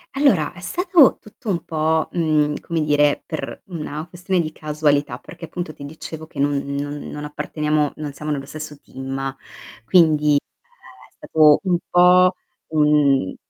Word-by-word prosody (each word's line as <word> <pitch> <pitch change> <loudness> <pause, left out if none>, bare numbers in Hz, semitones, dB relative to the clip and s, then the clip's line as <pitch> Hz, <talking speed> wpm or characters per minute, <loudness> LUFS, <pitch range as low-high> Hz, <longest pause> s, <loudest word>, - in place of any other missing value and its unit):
Allora, 240 - +3
è 175 - -14
stato 345 - +4
tutto 215 +1 -15
un 175 -4 -1
po', 160 0 0
mhmm, 155 -3 +1
come 165 -2 -2
dire, 145 -1 +2
per 155 - -6
una 155 -3 -5
questione 180 +1 -1
di 155 -1 -4
casualità, 150 -4 0
perché 165 - -10
appunto 165 -1 -6
ti 140 - -10
dicevo 160 +1 -8
che 155 - -16
non 145 0 +1
non 145 +1 -4
non 150 +1 -7
apparteniamo 150 0 -1
non 150 -1 -5
siamo 150 +2 -7
nello 135 -2 -3
stesso 155 0 -8
team, 135 0 -5 0.5
quindi 150 -4 +4 0.5
è - - -17
stato 155 -2 +4
un 180 -2 +2
po' 180 +1 +5 0.3
un 150 -8 +2
155 Hz, 150 wpm, -21 LUFS, 145-170 Hz, 0.5 s, po